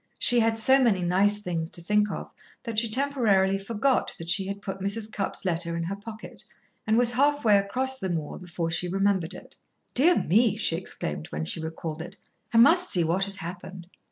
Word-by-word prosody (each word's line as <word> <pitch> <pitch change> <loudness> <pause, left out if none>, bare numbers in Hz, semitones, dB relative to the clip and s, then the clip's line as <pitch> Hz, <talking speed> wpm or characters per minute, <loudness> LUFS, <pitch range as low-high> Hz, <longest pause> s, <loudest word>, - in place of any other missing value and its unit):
She 245 -1 +3
had 225 0 +2
so 265 +5 +4
many 215 -8 +2
nice 195 +4 +3
things 165 -4 -3
to 175 - -5
think 210 +3 +2
of - - -6 0.3
that 230 -3 +1
she 230 0 +1
temporarily 215 -7 +2
forgot 230 +6 0
that 165 +1 -5
she 190 +1 +1
had 200 0 -5
put 195 -1 -6
Mrs. 210 +3 -3
Cupp's 200 -1 -4
letter 170 -1 -1
in 170 - -2
her 185 +4 -3
pocket, 215 +2 -10 0.4
and 220 +1 +3
was 240 0 +4
half 285 +2 +1
way 210 -2 +6
across 260 +7 -2
the 190 - -3
moor 160 -4 -4
before 170 -2 -4
she 180 +2 -1
remembered 195 -2 0
it. - - -13 0.4
"Dear 330 +8 +5
me!" 215 +3 +3
she 210 -6 -1
exclaimed 75 - -5
when 75 +1 -4
she 165 - -4
recalled 160 0 -5
it. 175 +1 -10 0.3
"I 230 - +1
must 345 +10 +5
see 175 - +5
what 175 +4 +1
has 200 0 -1
happened." 180 +1 -8
200 Hz, 205 wpm, -26 LUFS, 175-230 Hz, 0.4 s, way